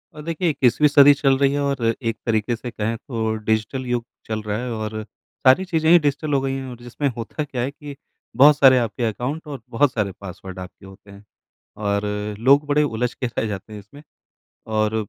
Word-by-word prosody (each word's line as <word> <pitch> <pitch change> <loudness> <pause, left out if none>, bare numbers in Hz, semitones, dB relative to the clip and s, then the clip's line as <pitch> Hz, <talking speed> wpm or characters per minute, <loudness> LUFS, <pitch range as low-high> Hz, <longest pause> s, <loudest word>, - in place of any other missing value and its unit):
अ, 150 - -8
देखिए 165 +2 -1
21वीं 140 +1 +3
सदीं 145 0 +7
चल 135 -1 +2
रही 140 0 +2
है 145 - -1
और 115 -5 0
एक 115 - -4
तरीके 110 0 0
से 120 +2 -7
कहें 110 0 -2
तो 110 -2 -3
डिजिटल 110 +4 -1
युग 120 -1 -2 0.2
चल 110 -1 -3
रहा 105 0 -3
है 125 - -4
और 110 -1 -4 0.4
सारी 130 +9 +5
चीज़ें 160 -3 0
ही 175 - +8
डिजिटल 145 0 -1
हो 140 - +3
गई 135 0 -2
हैं 135 -1 -5
और 125 - -9
जिसमें 120 +4 -3
होता 115 +6 -4
क्या 135 -4 -4
है 130 +3 -2
कि 145 0 -10 0.5
बहुत 145 +1 +8
सारे 135 -3 +7
आपके 115 -1 -2
अकाउंट 125 +8 -3
और 140 -4 -7
बहुत 125 +3 +2
सारे 105 -3 -1
पासवर्ड 95 0 -9
आपके 90 +1 -11
होते 95 +1 -15
हैं। 100 +1 -14 0.6
और 100 0 0 0.4
लोग 140 +5 +4
बड़े 145 +1 +3
उलझ 125 -2 -2
के 125 - -3
रह 115 - -3
जाते 105 +1 -6
हैं 105 - -7
इसमें 140 +9 -15 0.7
और 110 0 +1
125 Hz, 210 wpm, -22 LUFS, 110-145 Hz, 0.7 s, ही